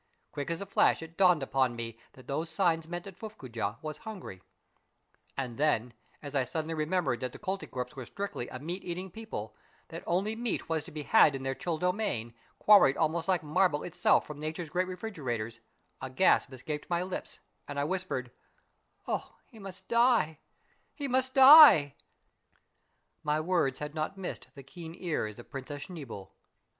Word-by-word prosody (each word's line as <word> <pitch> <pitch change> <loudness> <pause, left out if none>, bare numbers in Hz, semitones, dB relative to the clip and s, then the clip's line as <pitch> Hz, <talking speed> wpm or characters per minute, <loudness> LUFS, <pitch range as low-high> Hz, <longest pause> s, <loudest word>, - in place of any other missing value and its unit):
Quick 145 +1 -4
as 170 +1 -3
a - - -4
flash 195 -3 +3
it 165 +1 -11
dawned 180 -6 +4
upon 130 -2 +1
me 115 -1 -6
that 130 -2 -16
these 155 +4 -2
signs 165 -1 +1
meant 175 +1 -5
that 195 - -8
F 180 - -28
uflfcoojah 130 - -5
was 155 -1 -5
hungry 195 - -8 0.5
} - - -41
And 130 -2 -4
then, 125 -6 +1 0.3
as 145 -1 -7
I 135 -2 +2
suddenly 160 +5 -3
remembered 155 -5 0
that 125 0 -4
the - - -8
Koltykwerps 150 -10 -4
were 130 -3 -7
strictly 200 -11 -5
a 130 - -7
meaGeating 175 +4 -5
people, 150 - -7 0.3
that 165 - -7
only 195 +6 0
meat 235 -1 -2
was 160 -2 -1
to - - -11
be 150 -1 -5
had 150 -6 +5
in 135 - -5
their 135 0 -1
chill 165 +3 -3
domain, 180 - -1 0.2
quarried 200 -10 +6
almost 160 +1 0
like 185 -4 +2
marble 155 0 +2
itself 175 - +2
from 150 -1 -9
nature's 155 +1 -5
great 180 +2 0
refrigerators, 130 - -4 0.4
a 130 - -4
gasp 140 +2 +3
escaped 150 +4 -6
my 175 0 +1
lips, 185 0 -6 0.3
and 145 0 -4
I - - +1
whispered, 155 -7 -2 0.3
— - - -42
" - - -38
Oh, - - -3
he 225 - -16
must 195 -1 -9
die! 235 - +3 0.6
He 285 -2 -3
must 260 0 +1
die! 265 - +10 0.7
" - - -46
My 150 0 +1
words 155 -5 +1
had 150 0 -5
not 155 +4 -3
miss 190 - -4
ed - - -15
the 140 - -10
keen 165 +4 -10
ears 150 - -2
of 120 - -13
Princess 140 +1 -6
Schneeboule. 125 - -9
160 Hz, 185 wpm, -30 LUFS, 135-185 Hz, 0.7 s, die